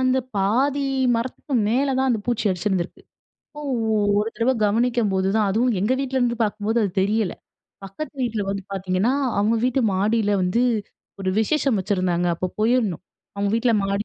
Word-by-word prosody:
அந்த 255 0 +2 0.2
பாதி 265 +9 +1 0.3
மரத்துக்கு 255 +3 -4
மேல 270 +4 +1
தான் 265 0 +2
அந்த 225 - 0
பூச்சி 235 -3 0
அரிச்சிருந்திருக்கு. 185 -1 -2 0.5
அப்போ 295 - -10 0.6
ஒரு 215 - -1
தடவ 240 +3 +2
கவனிக்கும்போதுதான், 210 -3 +1
அதுவும் 230 +3 +1
எங்க 215 +6 +1
வீட்ல 265 -1 -1
இருந்து 240 -1 +1
பாக்கும்போது 215 +2 0
அது 200 - 0
தெரியல. 210 -1 0 0.5
பக்கத்து 195 +12 -7
வீட்ல 225 -4 -1
வந்து 195 0 -3
பாத்திங்கன்னா, 190 +5 0 0.3
அவங்க 215 +3 +2
வீட்டு 255 +1 +1
மாடில 210 +2 +1
வந்து 185 +7 +1 0.6
ஒரு 190 -1 0
விசேஷம் 270 -1 +1
வச்சிருந்தாங்க. 185 -3 0
அப்ப 185 +1 -3
போயிருந்தோம் 220 -6 +1 0.3
அவங்க 200 0 0
வீட்ல 230 +1 +2
மாடி 200 +2 -1
220 Hz, 150 wpm, -23 LUFS, 195-250 Hz, 0.6 s, அந்த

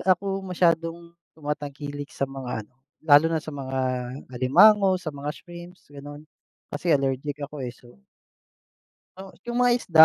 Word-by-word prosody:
ako 195 +1 +1
masyadong 170 -2 0 0.2
tumatangkilik 145 -1 -5
sa - - -1
mga 130 -5 -5
ano, 125 - -32 0.3
lalo 145 0 +7
na 160 -1 +1
sa 155 - -7
mga 135 -1 -4 0.6
alimango, 190 - +6
sa 170 -4 -5
mga 145 +1 -4
shrimps, 175 +1 -12
gano'n. 145 +1 -9 0.5
Kasi 160 +3 +1
allergic 135 +1 -2
ako 150 0 -8
eh, 125 -1 -4
so. 120 +4 -19 1.2
O, - - -7 0.2
'yong 240 0 -3
mga 245 0 +5
isda, 160 -8 +8
150 Hz, 145 wpm, -25 LUFS, 140-175 Hz, 1.2 s, isda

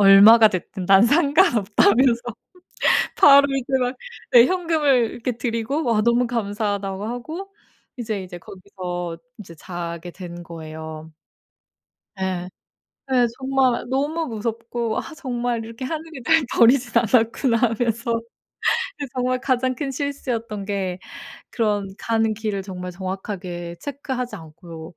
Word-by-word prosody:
얼마가 205 +3 +8
됐든 185 0 -5
난 195 0 +7
상관없다면서 245 - +3 0.9
바로 280 0 +7
이제 260 -2 -3
막 250 +1 -1 0.4
네 240 -1 +8
현금을 300 -8 +2
이렇게 240 0 -4
드리고 235 +6 -2
와 230 -3 +2
"너무 235 +2 +2
감사하다."고 205 -3 -2
하고 315 - -6 0.4
이제, 220 -4 -3
이제 180 -1 -9
거기서 180 -2 -6 0.2
이제 170 -5 -11
자게 175 0 -6
된 175 -2 -9
거예요. 160 -1 -9 1.1
예. 185 -1 -2 0.6
예 245 -2 +4
정말 265 -2 +1
너무 295 +5 -1
무섭고 230 -1 -3
'아 - - -5
정말 245 -4 -2
이렇게 230 +3 -7
하늘이 320 -1 -6
날 325 -2 +4
버리진 240 0 +4
않았구나.' 230 +1 +3
하면서 230 0 0 0.8
그 285 - -4
정말 255 0 0
가장 255 -1 0
큰 275 +1 -3
실수였던 245 -7 -4
게 195 -3 -2 0.5
그런 210 -4 0
가는 225 -1 0
길을 210 -2 -3
정말 180 -2 -6
정확하게 185 -2 -6
체크하지 265 -3 -4
않고 160 +1 -11
230 Hz, 265 characters per minute, -22 LUFS, 190-255 Hz, 1.1 s, 얼마가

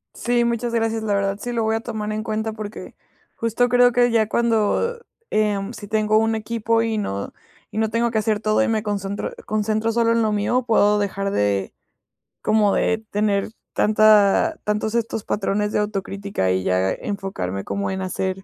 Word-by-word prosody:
Sí, 240 0 +1
muchas 235 0 -1
gracias, 225 -1 0
la 210 -2 0
verdad 200 0 0
sí 245 - -4
lo 230 -1 0
voy 220 0 +1
a 225 - -2
tomar 220 -3 -4
en 215 0 -3
cuenta 220 0 -2
porque 215 -1 -8 0.4
justo 230 +2 +1
creo 245 0 +5
que 245 0 +3
ya 220 -2 +3
cuando, 235 - +1 0.3
em, 210 -1 0
si 210 -2 -9
tengo 215 0 +2
un 225 +1 +2
equipo 225 +1 0
y 225 -1 -1
no 100 - -3 0.4
y - - -7
no 220 0 +1
tengo 235 +1 +1
que 225 - -2
hacer 215 -1 +1
todo 215 +4 +2
y - - 0
me 220 -2 +1
concentro 200 -1 -3
concentro 215 +1 0
solo 230 0 +2
en 230 -1 +2
lo 215 - +1
mío, 210 +5 +1
puedo 210 -2 +4
dejar 200 -1 -1
de, 100 - 0 0.7
como 215 -2 +3
de 220 0 +1
tener 205 -1 0 0.2
tanta 215 +8 +4
tantos 210 +1 -1
estos 230 -2 -1
patrones 210 +1 -1
de - - +1
autocrítica 200 - -2
y 95 0 0
ya 95 +1 +1
enfocarme 190 - -4
como 200 -1 -3
en 190 0 -3
hacer, 190 0 -3
215 Hz, 185 wpm, -22 LUFS, 200-225 Hz, 0.7 s, creo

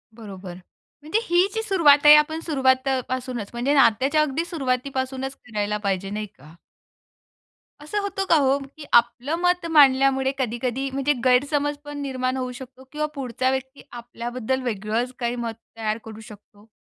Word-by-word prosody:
बरोबर, 195 -5 -9 0.5
म्हणजे 310 +9 0
ही 355 -2 +3
जी 445 - -1
सुरुवात 305 -9 +4
आहे. 295 0 +11
आपण 300 +1 +2
सुरवातपासूनच 260 -5 0
म्हणजे 245 +4 0
नात्याच्या 275 +3 +4
अगदी 305 +2 -1
सुरुवातीपासूनच 265 -3 -3
करायला 210 -4 -3
पाहिजे, 195 0 -1
नाही 210 +1 -4
का? 155 -6 -18 1.3
असं 305 +8 -3
होतं 395 -1 -3
का - - +6
हो, 275 -1 +3 0.2
की 305 - -9
आपलं 240 +5 +3
मत 355 -1 +1
मांडल्यामुळे 270 -2 +4
कधी-कधी 250 +2 -2
म्हणजे 275 +2 +1
गैरसमज 285 +3 +2
पण 290 0 -7
निर्माण 260 -2 -2
होऊ 255 -1 -3
शकतो 260 0 -12
किंवा 305 0 -2
पुढचा 255 -1 -1
व्यक्ती 265 +1 -5
आपल्याबद्दल 240 +1 -4
वेगळंच 225 +2 -2
काही 240 -1 -1
मत 235 -2 -4 0.2
तयार 215 -1 -1
करू 220 -1 -10
शकतो? 210 0 -17
260 Hz, 145 wpm, -23 LUFS, 235-290 Hz, 1.3 s, आहे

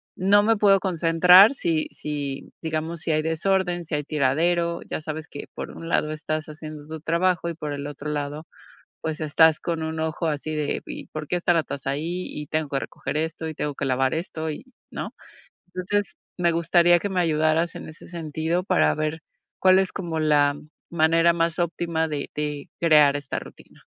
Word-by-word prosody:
no 200 +2 +4
me 225 +1 +3
puedo 200 -1 +5
concentrar, 180 - +6
si 165 - 0
si, 145 -2 -5
digamos, 160 +1 -3
si - - -2
hay 155 0 +1
desorden, 175 +2 0
si 155 - -3
hay 150 - -1
tiradero. 170 +5 +1
Ya - - -4
sabes 155 0 -5
que, 145 - -8
por - - -6
un 165 - -8
lado 155 - +1
estás 155 0 -3
haciendo 155 -1 -9
tu 160 0 -6
trabajo, 170 +2 +1
y 170 - -5
por 150 -2 -5
el 140 0 -5
otro 145 +1 -6
lado, 145 +1 -4 0.6
pues 160 -1 -3
estás 155 +1 +4
con 165 -2 -2
un 160 0 -3
ojo, 160 +1 -2
así 155 0 -2
de: 150 -1 -2
"¿Y - - -8
por 155 -1 -6
qué 180 - 0
está 175 0 +2
la 165 -2 +2
taza 140 -2 -4
ahí? 170 +6 -3
Y 150 -1 -7
tengo 155 -1 -1
que 135 - 0
recoger 135 +2 -5
esto, 160 +1 -3
y 160 - -5
tengo 145 -1 -3
que - - -3
lavar 130 0 +1
esto, 160 -1 -4
y", 155 - -7 0.3
¿no? - - -6 0.5
Entonces, 185 +3 -2 0.2
me 170 -1 +3
gustaría 170 +1 +4
que 205 - -3
me 190 -2 -1
ayudaras 160 +1 +1
en - - -8
ese 155 - -13
sentido, 165 +1 -2
para 75 - +3
ver, 155 +1 -2 0.4
cuál 185 0 +6
es, 190 -1 0
como 170 -4 -4
la 145 -2 +3 0.3
manera 165 +1 +4
más 165 -1 0
óptima 170 -1 -1
de 150 -2 -4
de 150 -1 -4
crear 150 -4 +5
esta 140 -1 -4
rutina. - - -15
160 Hz, 195 wpm, -24 LUFS, 150-170 Hz, 0.6 s, concentrar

